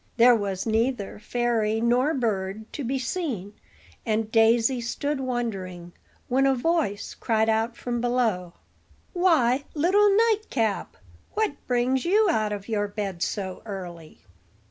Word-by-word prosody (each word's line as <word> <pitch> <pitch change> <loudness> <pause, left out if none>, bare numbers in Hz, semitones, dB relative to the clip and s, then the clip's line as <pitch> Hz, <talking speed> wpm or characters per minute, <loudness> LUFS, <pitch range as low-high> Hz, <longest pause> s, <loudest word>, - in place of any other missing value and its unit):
There 245 +1 +7
was 200 -4 -2
neither 225 -2 -1
fairy 225 -1 0
nor 245 +6 +2
bird 215 -4 -2
to 290 - -4
be 265 +3 -1
seen; 250 - -3 0.5
and 220 -1 -1
Daisy 230 +2 +3
stood 285 +5 -2
wondering, 195 -9 -4 0.3
when 270 +2 +3
a 270 - +3
voice 275 - -1
cried 220 -1 0
out 225 +2 0
from 240 -1 -3
below: 225 -8 0 0.6
"Why, 290 -8 +3
little 385 +7 +4 0.2
nightcap, 270 - -1 0.4
what 435 -6 +1
brings 250 +1 +1
you 415 +5 +3
out 215 -8 0
of 200 -1 -5
your 210 -2 0
bed 200 -4 -5
so 190 -3 -3
early?" 175 -6 -8
230 Hz, 130 wpm, -25 LUFS, 205-265 Hz, 0.6 s, There